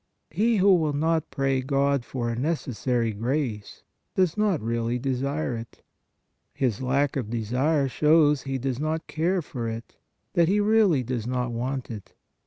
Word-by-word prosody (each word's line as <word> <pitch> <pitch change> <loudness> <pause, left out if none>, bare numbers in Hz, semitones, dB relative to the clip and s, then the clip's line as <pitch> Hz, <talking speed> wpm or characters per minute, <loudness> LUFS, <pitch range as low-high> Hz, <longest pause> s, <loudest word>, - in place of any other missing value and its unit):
He 220 +7 +2
who 195 0 +5
will 160 -4 +2
not 160 +2 0
pray 135 -1 0
God 140 0 +1
for 120 -2 -3
a - - -3
neces 145 +1 -2
sary 120 -2 0
grace, 115 -1 -3 0.3
does 185 -4 +2
not 210 -6 +1
really 115 +1 -1
desire 135 +2 -2
it; 115 0 -9 0.7
his 125 -5 0
lack 135 +2 +1
of 125 -6 -2
desire 130 +6 +1
shows 150 +2 +4
that - - -6
he 135 - -1
does 130 -1 -3
not 155 +2 -2
care 175 +3 0
for 120 -5 -4
it, 115 +1 -8 0.4
that 170 -1 +4
he 200 +4 +2
really 205 - +3
does 120 -2 -3
not 125 -1 -1
want 125 +2 -3
it. 105 -4 -9
135 Hz, 170 wpm, -26 LUFS, 120-160 Hz, 0.7 s, who